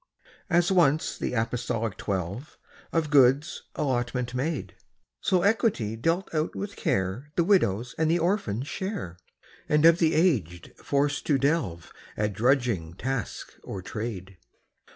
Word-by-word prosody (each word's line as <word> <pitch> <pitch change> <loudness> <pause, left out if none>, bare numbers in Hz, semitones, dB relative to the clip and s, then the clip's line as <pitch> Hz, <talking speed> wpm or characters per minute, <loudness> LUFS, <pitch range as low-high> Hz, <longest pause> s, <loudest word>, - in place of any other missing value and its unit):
As 175 +1 +3
once 160 -5 +3
the - - -3
apostolic 115 -2 -1
twelve 100 - -4 0.3
Of 160 -3 0
goods 140 +1 +4
allotment 125 -3 -1
made, 140 +4 -2 0.5
So 180 -2 +1
equity 200 - +1
dealt 165 +11 -1
out 155 0 -1
with 200 0 -5
care 95 +10 -1
The 170 - +3
widow's 125 - +2
and 160 -1 +2
the 170 - +3
orphan's 160 - -1
share, 190 - -5 0.5
And 150 +1 +4
of 165 +1 +7
the 165 -1 +3
aged 110 - +1
forced 145 +1 -1
to 145 - +4
delve 135 - -1 0.2
At 105 -1 0
drudging 115 - +1
task 130 +2 -4
or 95 -2 -6
trade. 95 -4 -6
135 Hz, 130 wpm, -27 LUFS, 110-165 Hz, 0.5 s, of